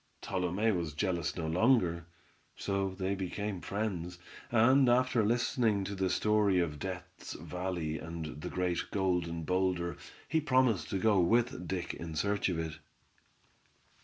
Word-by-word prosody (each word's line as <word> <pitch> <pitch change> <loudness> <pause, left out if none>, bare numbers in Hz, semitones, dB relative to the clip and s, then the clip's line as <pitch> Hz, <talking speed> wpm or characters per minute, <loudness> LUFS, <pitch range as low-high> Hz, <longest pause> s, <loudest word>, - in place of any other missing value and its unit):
Tolume 95 +4 0
was 85 -4 -3
jealous 85 -3 -1
no 85 - -2
longer; 85 -2 +2 0.5
so 95 -1 -1
they 95 0 -1
became 100 0 -3
friends, 90 -4 -3 0.3
and 125 +3 +5
after 125 -1 +3
listening 115 -2 +2
to 100 - -4
the 95 -1 0
story 105 0 +3
of 80 -5 0
Death's 90 +1 -6
Valley 90 -4 -3
and 80 -2 -6
the - - -4
great 90 -2 -1
Golden 90 -4 0
Boulder, 90 -1 0 0.3
he 160 +3 +1
promised 130 -7 +2
to 95 - -1
go 100 +1 +3
with 115 0 +2
Dick 90 0 -3
in 80 -1 -6
search 100 +5 +1
of 90 - -1
it. 80 -1 -4
95 Hz, 140 wpm, -32 LUFS, 85-105 Hz, 0.5 s, and